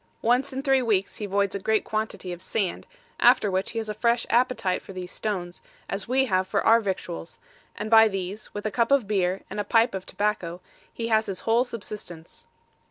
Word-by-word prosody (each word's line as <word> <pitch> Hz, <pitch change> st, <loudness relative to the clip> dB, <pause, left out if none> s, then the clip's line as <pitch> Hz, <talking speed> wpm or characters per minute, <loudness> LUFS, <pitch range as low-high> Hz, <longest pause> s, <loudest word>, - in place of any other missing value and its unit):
Once 250 Hz, +4 st, +2 dB
in 265 Hz, +1 st, -4 dB
three 270 Hz, -2 st, +3 dB
weeks 205 Hz, -5 st, 0 dB
he 210 Hz, -, -4 dB
voids 200 Hz, 0 st, +1 dB
a 200 Hz, -, -2 dB
great 220 Hz, +3 st, +1 dB
quantity 215 Hz, -4 st, -3 dB
of 175 Hz, -, -9 dB
sand, 190 Hz, -1 st, -2 dB, 0.3 s
after 240 Hz, -4 st, +5 dB
which 190 Hz, +1 st, -1 dB
he -, -, -6 dB
has 225 Hz, -1 st, -2 dB
a 210 Hz, -, -2 dB
fresh 235 Hz, +2 st, +1 dB
appetite 235 Hz, -6 st, +2 dB
for 195 Hz, -, -11 dB
these 180 Hz, -1 st, -6 dB
stones, 180 Hz, -5 st, -4 dB, 0.3 s
as 195 Hz, 0 st, -4 dB
we 265 Hz, +2 st, +3 dB
have 185 Hz, -5 st, +1 dB
for -, -, 0 dB
our 230 Hz, +1 st, +7 dB
victuals, 180 Hz, -, -5 dB, 0.4 s
and 215 Hz, +1 st, -5 dB
by 225 Hz, 0 st, +8 dB
these, 195 Hz, +1 st, -5 dB
with 205 Hz, +1 st, -6 dB
a 215 Hz, -, 0 dB
cup 230 Hz, +2 st, +1 dB
of 275 Hz, -7 st, +4 dB
beer, 190 Hz, -2 st, 0 dB
and -, -, -6 dB
a -, -, +1 dB
pipe 230 Hz, +2 st, +3 dB
of 190 Hz, -1 st, -4 dB
tobacco, 185 Hz, -5 st, -2 dB, 0.3 s
he 230 Hz, 0 st, -4 dB
has 220 Hz, -1 st, +3 dB
his 190 Hz, -2 st, -4 dB
whole 230 Hz, +2 st, +3 dB
subsistence. 210 Hz, -8 st, -8 dB
210 Hz, 210 wpm, -26 LUFS, 190-230 Hz, 0.4 s, by